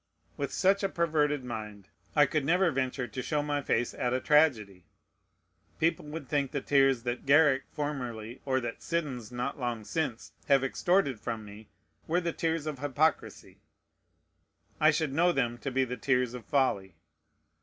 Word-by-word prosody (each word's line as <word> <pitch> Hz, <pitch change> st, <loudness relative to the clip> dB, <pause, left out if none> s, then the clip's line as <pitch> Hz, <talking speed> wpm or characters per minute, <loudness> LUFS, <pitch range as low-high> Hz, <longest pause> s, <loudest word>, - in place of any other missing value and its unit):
With 140 Hz, -, -3 dB
such 195 Hz, +1 st, +2 dB
a 195 Hz, -, 0 dB
perverted 150 Hz, -5 st, +1 dB
mind, 105 Hz, -5 st, -7 dB, 0.3 s
I 150 Hz, -1 st, +6 dB
could 150 Hz, +1 st, -1 dB
never 175 Hz, +4 st, +3 dB
venture 130 Hz, -1 st, -2 dB
to 125 Hz, +3 st, -5 dB
show 150 Hz, +2 st, -1 dB
my 145 Hz, -1 st, -1 dB
face 120 Hz, -3 st, 0 dB
at 125 Hz, 0 st, -1 dB
a -, -, +1 dB
tragedy. 120 Hz, -, +2 dB, 0.9 s
People 165 Hz, -1 st, +1 dB
would 150 Hz, -1 st, -7 dB
think 140 Hz, -1 st, 0 dB
the 140 Hz, -, -2 dB
tears 135 Hz, -3 st, +3 dB
that 120 Hz, +1 st, -4 dB
Garrick 145 Hz, -2 st, +5 dB
formerly, 125 Hz, -6 st, -5 dB
or 130 Hz, -1 st, +1 dB
that 120 Hz, -1 st, -5 dB
Siddons 135 Hz, -9 st, -3 dB
not 125 Hz, +3 st, -3 dB
long 120 Hz, -3 st, -3 dB
since, 135 Hz, -2 st, -3 dB
have 140 Hz, -2 st, +4 dB
extorted 140 Hz, -, +1 dB
from 115 Hz, -2 st, -5 dB
me, 105 Hz, +1 st, -12 dB, 0.4 s
were 170 Hz, +3 st, +2 dB
the 170 Hz, -2 st, -2 dB
tears 165 Hz, -2 st, -1 dB
of 150 Hz, -4 st, -4 dB
hypocrisy; 145 Hz, +3 st, -1 dB, 1.2 s
I 155 Hz, -, +6 dB
should 155 Hz, -3 st, 0 dB
know 175 Hz, +4 st, +4 dB
them 120 Hz, -6 st, -1 dB
to 135 Hz, -, -3 dB
be 135 Hz, 0 st, +1 dB
the 125 Hz, 0 st, -5 dB
tears 125 Hz, -3 st, +1 dB
of 125 Hz, -2 st, -8 dB
folly. 130 Hz, -10 st, 0 dB
135 Hz, 165 wpm, -29 LUFS, 120-155 Hz, 1.2 s, I